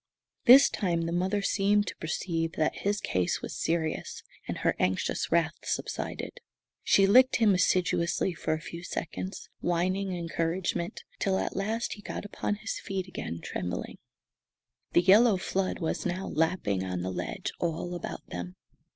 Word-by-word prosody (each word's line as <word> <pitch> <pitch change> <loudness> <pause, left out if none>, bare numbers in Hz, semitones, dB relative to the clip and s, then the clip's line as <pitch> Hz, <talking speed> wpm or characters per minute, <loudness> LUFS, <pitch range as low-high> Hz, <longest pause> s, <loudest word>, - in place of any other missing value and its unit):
This 265 +3 +10
time 170 -5 -1
the 165 - -2
mother 190 +4 0
seemed 205 +1 +3
to - - -5
perceive 165 0 -2
that 155 - 0
his 205 +1 0
case 90 - -1
was - - -5
serious, 160 -1 -1 0.2
and - - -3
her - - +2
anxious 95 0 0
wrath - - +3
subsided. - - -4 0.4
She 195 - +5
licked 255 +6 +6
him 220 -3 +4
assiduously 180 0 +2
for 165 - -1
a - - -5
few 170 +1 -7
seconds, 185 +2 -5
whining 185 +3 0
encouragement, 170 +1 -2 0.2
till 190 -1 +1
at - - -2
last 220 +4 -1
he 210 - -11
got 205 - -6
upon 205 0 -2
his 215 +1 -4
feet 195 -2 -4
again, 85 - -5
trembling. 90 -1 -4 0.9
The - - +6
yellow 205 +3 +6
flood 190 0 -1
was 165 - -2
now 185 +1 -2
lapping 155 - 0
on 90 -1 -3
the 95 - -2
ledge - - -4
all 170 +1 -2
about 175 - -6
them. 90 +1 -6
180 Hz, 155 wpm, -29 LUFS, 165-195 Hz, 0.9 s, This